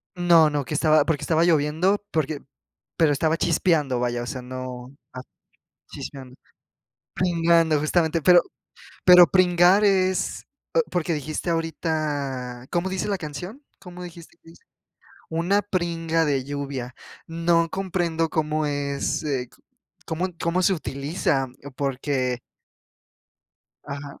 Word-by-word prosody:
No, 170 Hz, -3 st, +5 dB
no, 145 Hz, -2 st, -2 dB
que 150 Hz, -, -5 dB
estaba 155 Hz, -1 st, +4 dB
porque 160 Hz, -4 st, -1 dB
estaba 165 Hz, 0 st, +2 dB
lloviendo 165 Hz, +5 st, +2 dB
porque 155 Hz, -2 st, -1 dB, 0.6 s
pero 160 Hz, -3 st, +4 dB
estaba 160 Hz, +3 st, +1 dB
chispeando, 155 Hz, -6 st, +1 dB
vaya, 120 Hz, -1 st, -1 dB
o 120 Hz, -, -6 dB
sea, 125 Hz, +1 st, -5 dB
no, 130 Hz, +1 st, -7 dB, 0.2 s
ah, 130 Hz, -, -6 dB, 0.7 s
chispeando. 130 Hz, -2 st, -9 dB, 0.8 s
Pringando, 165 Hz, -3 st, +2 dB
justamente. 160 Hz, +1 st, +1 dB
Pero 180 Hz, +1 st, +6 dB, 0.6 s
pero 180 Hz, -2 st, +9 dB
pringar 180 Hz, +3 st, +4 dB
es, 190 Hz, -2 st, +1 dB, 0.3 s
eh, 485 Hz, -, +5 dB
porque 170 Hz, -1 st, -1 dB
dijiste 155 Hz, +3 st, -4 dB
ahorita. 145 Hz, -6 st, -3 dB
¿Cómo 175 Hz, +1 st, 0 dB
dice 190 Hz, +2 st, -2 dB
la 200 Hz, -2 st, -1 dB
canción? 175 Hz, -, -8 dB, 0.2 s
¿Cómo 180 Hz, 0 st, -10 dB
dijiste 170 Hz, -1 st, -12 dB
que 165 Hz, -, -19 dB
dice? -, -, -20 dB, 0.7 s
Una 175 Hz, +5 st, +1 dB
pringa 165 Hz, -4 st, -1 dB
de 135 Hz, -3 st, 0 dB
lluvia. 140 Hz, -3 st, -5 dB, 0.3 s
No 165 Hz, 0 st, +1 dB
comprendo 175 Hz, -4 st, -1 dB
cómo 155 Hz, -1 st, -1 dB
es, 140 Hz, -1 st, -2 dB
eh, 130 Hz, -5 st, -2 dB, 0.6 s
cómo 170 Hz, +4 st, -2 dB
cómo 175 Hz, +2 st, +1 dB
se 195 Hz, -, +3 dB
utiliza, 140 Hz, -2 st, -1 dB, 0.2 s
eh, 140 Hz, -, -9 dB
porque 130 Hz, -2 st, -1 dB, 1.4 s
Ajá. 140 Hz, 0 st, -8 dB
160 Hz, 125 wpm, -24 LUFS, 140-175 Hz, 1.4 s, pero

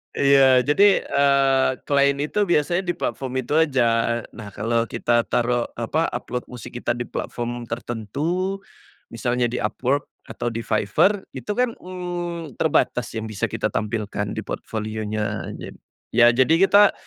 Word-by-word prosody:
Iya, 135 Hz, -2 st, +5 dB
jadi, 195 Hz, +6 st, +4 dB
eee, 135 Hz, -2 st, +3 dB, 0.2 s
klien 140 Hz, -1 st, +3 dB
itu 150 Hz, +9 st, 0 dB
biasanya 175 Hz, 0 st, +1 dB
di 175 Hz, -, -1 dB
platform 135 Hz, -6 st, -4 dB
itu 130 Hz, +4 st, -2 dB
aja. 150 Hz, -6 st, +3 dB, 0.5 s
Nah, 105 Hz, -2 st, -9 dB
kalau 115 Hz, +3 st, 0 dB
kita 120 Hz, 0 st, +1 dB
taruh, 120 Hz, 0 st, 0 dB
apa, 120 Hz, +8 st, -1 dB
upload 125 Hz, 0 st, -4 dB
musik 125 Hz, 0 st, -9 dB
kita 120 Hz, -, -1 dB
di 120 Hz, 0 st, -3 dB
platform 120 Hz, 0 st, -4 dB
tertentu, 140 Hz, -, -3 dB, 0.5 s
misalnya 120 Hz, +1 st, -1 dB
di 120 Hz, +1 st, -3 dB
Upwork, 130 Hz, +6 st, 0 dB, 0.2 s
atau 120 Hz, -, -4 dB
di 115 Hz, -, -3 dB
Fiverr, 115 Hz, -, +1 dB
itu -, -, -5 dB
kan, 250 Hz, -1 st, +2 dB
mmm, 175 Hz, -4 st, -5 dB
terbatas -, -, +1 dB
yang 110 Hz, -, -3 dB
bisa 110 Hz, -3 st, -2 dB
kita -, -, -2 dB
tampilkan 105 Hz, -1 st, -2 dB
di -, -, -4 dB
portfolio-nya 110 Hz, -1 st, -4 dB
aja. -, -, -8 dB, 0.5 s
Ya, 120 Hz, -, +6 dB
jadi 130 Hz, +5 st, +4 dB
kita 205 Hz, 0 st, +6 dB
125 Hz, 145 wpm, -23 LUFS, 115-160 Hz, 0.5 s, Ya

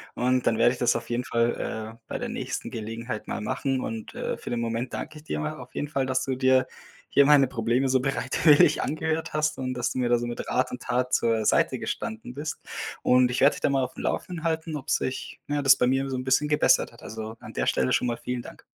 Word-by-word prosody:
und 125 Hz, 0 st, +1 dB
dann 110 Hz, -, +3 dB
werde 120 Hz, +1 st, +5 dB
ich 130 Hz, -, -5 dB
das 120 Hz, -, +3 dB
auf 115 Hz, 0 st, -4 dB
jeden 120 Hz, +1 st, -1 dB
Fall, 115 Hz, -1 st, -1 dB
äh, -, -, -25 dB
bei -, -, -3 dB
der -, -, -4 dB
nächsten -, -, -4 dB
Gelegenheit 115 Hz, +1 st, -5 dB
mal -, -, -3 dB
machen 130 Hz, +4 st, -1 dB
und, 110 Hz, -1 st, -6 dB
äh, -, -, -3 dB
für -, -, -8 dB
den 120 Hz, -1 st, -1 dB
Moment 115 Hz, +2 st, -2 dB
danke 155 Hz, -, -5 dB
ich 150 Hz, -, -14 dB
dir -, -, -3 dB
mal 155 Hz, 0 st, -3 dB
auf 125 Hz, -, -12 dB
jeden 145 Hz, -, -2 dB
Fall, 135 Hz, -3 st, 0 dB
dass 130 Hz, 0 st, 0 dB
du 130 Hz, -1 st, -2 dB
dir 130 Hz, 0 st, +4 dB, 0.4 s
hier 140 Hz, -, +5 dB
meine 140 Hz, -2 st, +6 dB
Probleme 120 Hz, +3 st, 0 dB
so 130 Hz, 0 st, +3 dB
bereitwillig 135 Hz, +3 st, +4 dB
angehört 160 Hz, +1 st, -2 dB
hast 155 Hz, 0 st, 0 dB
und 130 Hz, -1 st, -3 dB
dass 125 Hz, -1 st, -1 dB
du -, -, -5 dB
mir 125 Hz, -, +1 dB
da 120 Hz, 0 st, +4 dB
so 120 Hz, -, -3 dB
mit 120 Hz, -, -5 dB
Rat 130 Hz, 0 st, 0 dB
und 125 Hz, -, -6 dB
Tat 125 Hz, +1 st, -1 dB
zur 115 Hz, -2 st, +2 dB
Seite -, -, +2 dB
gestanden 110 Hz, +3 st, -5 dB
bist. 150 Hz, +2 st, -5 dB, 0.4 s
Und 125 Hz, 0 st, +4 dB
ich 125 Hz, -, -1 dB
werde 140 Hz, -, +6 dB
dich -, -, -9 dB
da -, -, +2 dB
mal 135 Hz, -1 st, +2 dB
auf 125 Hz, -, -5 dB
dem -, -, -7 dB
Laufen 175 Hz, -3 st, -3 dB
halten, 160 Hz, -1 st, -1 dB
ob 135 Hz, -, -9 dB
sich, 130 Hz, -, -2 dB
ja, 145 Hz, 0 st, 0 dB
das 135 Hz, -1 st, +7 dB
bei 125 Hz, -, +2 dB
mir 135 Hz, +1 st, +1 dB
so 130 Hz, -, -2 dB
'n 130 Hz, -, -3 dB
bisschen 130 Hz, +3 st, +2 dB
gebessert 150 Hz, 0 st, +3 dB
hat. -, -, -16 dB
Also 110 Hz, 0 st, -6 dB
an -, -, -9 dB
der -, -, -1 dB
Stelle 65 Hz, -, +1 dB
schon 125 Hz, -, +2 dB
mal 120 Hz, -, 0 dB
vielen 125 Hz, -1 st, -4 dB
Dank. -, -, -12 dB
130 Hz, 255 wpm, -26 LUFS, 120-140 Hz, 0.4 s, das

